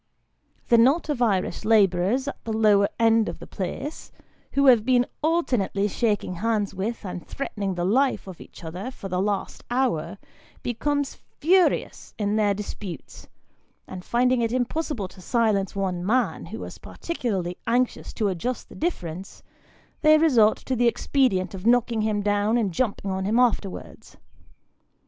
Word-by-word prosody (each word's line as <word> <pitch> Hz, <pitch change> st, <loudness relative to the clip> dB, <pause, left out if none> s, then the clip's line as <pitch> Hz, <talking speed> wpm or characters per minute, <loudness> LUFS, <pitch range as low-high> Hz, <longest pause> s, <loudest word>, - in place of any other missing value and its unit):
The 235 Hz, -, +6 dB
knot 275 Hz, +8 st, +3 dB
of 280 Hz, -5 st, -1 dB
Irish 200 Hz, -5 st, 0 dB
labourers 210 Hz, +3 st, +3 dB
at 280 Hz, -, -6 dB
the 225 Hz, -, -4 dB
lower 210 Hz, -2 st, +4 dB
end 225 Hz, -1 st, +3 dB
of -, -, -6 dB
the -, -, -10 dB
place, 220 Hz, -, -6 dB, 0.4 s
who 280 Hz, 0 st, +3 dB
have 245 Hz, -5 st, +6 dB
been 245 Hz, 0 st, +3 dB, 0.2 s
alternately 250 Hz, -, +1 dB
shaking 210 Hz, -3 st, -1 dB
hands 210 Hz, -1 st, 0 dB
with, 210 Hz, +4 st, -4 dB
and 180 Hz, -2 st, -5 dB
threatening 200 Hz, -8 st, -4 dB
the 175 Hz, 0 st, -1 dB
life 255 Hz, +4 st, +2 dB
of 190 Hz, -3 st, -10 dB
each -, -, -13 dB
other, 180 Hz, +9 st, -5 dB
for 200 Hz, -6 st, -8 dB
the 180 Hz, 0 st, 0 dB
last 200 Hz, -1 st, -2 dB
hour, 240 Hz, -8 st, 0 dB, 0.5 s
become 285 Hz, +4 st, 0 dB
furious 350 Hz, +6 st, 0 dB
in 205 Hz, -1 st, 0 dB
their 205 Hz, -2 st, +2 dB
disputes, 195 Hz, -5 st, -8 dB, 0.6 s
and 180 Hz, -1 st, -8 dB
finding 250 Hz, +3 st, +2 dB
it 230 Hz, -1 st, 0 dB
impossible 255 Hz, -, -2 dB
to 185 Hz, -, -15 dB
silence 210 Hz, -2 st, +1 dB
one 185 Hz, -3 st, -2 dB
man, 245 Hz, +7 st, 0 dB
who -, -, -7 dB
is -, -, -9 dB
particularly 195 Hz, -, -4 dB
anxious 245 Hz, +1 st, 0 dB
to 215 Hz, -, 0 dB
adjust 200 Hz, +7 st, -3 dB
the -, -, -12 dB
difference, 190 Hz, -, -4 dB, 0.6 s
they 310 Hz, 0 st, +6 dB
resort 245 Hz, -9 st, +4 dB
to 260 Hz, -, -3 dB
the 240 Hz, 0 st, +3 dB
expedient 235 Hz, -7 st, +1 dB
of 190 Hz, +3 st, -5 dB
knocking 235 Hz, -2 st, +3 dB
him 210 Hz, -1 st, 0 dB
down 205 Hz, +2 st, +2 dB
and 215 Hz, -5 st, 0 dB
jumping 200 Hz, -3 st, -1 dB
on 190 Hz, 0 st, -2 dB
him 215 Hz, +4 st, +1 dB
afterwards. 230 Hz, -6 st, -1 dB
220 Hz, 155 wpm, -25 LUFS, 195-250 Hz, 0.6 s, The